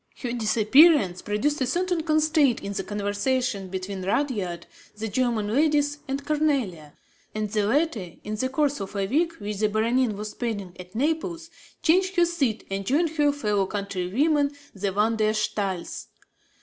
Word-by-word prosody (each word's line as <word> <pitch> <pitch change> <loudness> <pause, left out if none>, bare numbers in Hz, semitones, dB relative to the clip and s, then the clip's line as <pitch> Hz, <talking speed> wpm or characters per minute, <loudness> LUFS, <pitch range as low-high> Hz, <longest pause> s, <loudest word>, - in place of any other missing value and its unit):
Her 245 - -2
disappearance 225 - +4
produced 270 +9 -1
a 260 - +2
certain 355 +4 0
constraint 310 -4 +3
in 200 - -4
the - - -3
conversation 205 +1 -1
between 190 +1 -5
Rudyard, 195 -6 -1 0.3
the 220 +1 -3
German 220 -2 0
ladies 290 +1 +2
and 275 +1 -3
Cornélie; 260 - 0 0.4
and 215 -1 -2
the 210 -2 +1
latter, 235 - 0
in 210 - -5
the 260 +5 -1
course 285 +1 0
of 195 +1 -6
a 200 -1 0
week 330 - +1
which 210 -7 -5
the 215 +1 +2
Baronin 225 +1 +1
was 210 +1 -5
spending 205 -7 -4
at 180 +3 -11
Naples, 325 +5 -1 0.3
changed 370 +3 +3
her 350 -1 +5
seat 280 -10 -1
and 195 0 -2
joined 300 - +2
her 295 -2 +2
fellow 210 -8 0
countrywomen 215 - 0 0.2
the 200 0 -2
Van 215 +3 +1
der 215 0 +2
Staals. 200 -4 -2
230 Hz, 160 wpm, -25 LUFS, 200-295 Hz, 0.4 s, her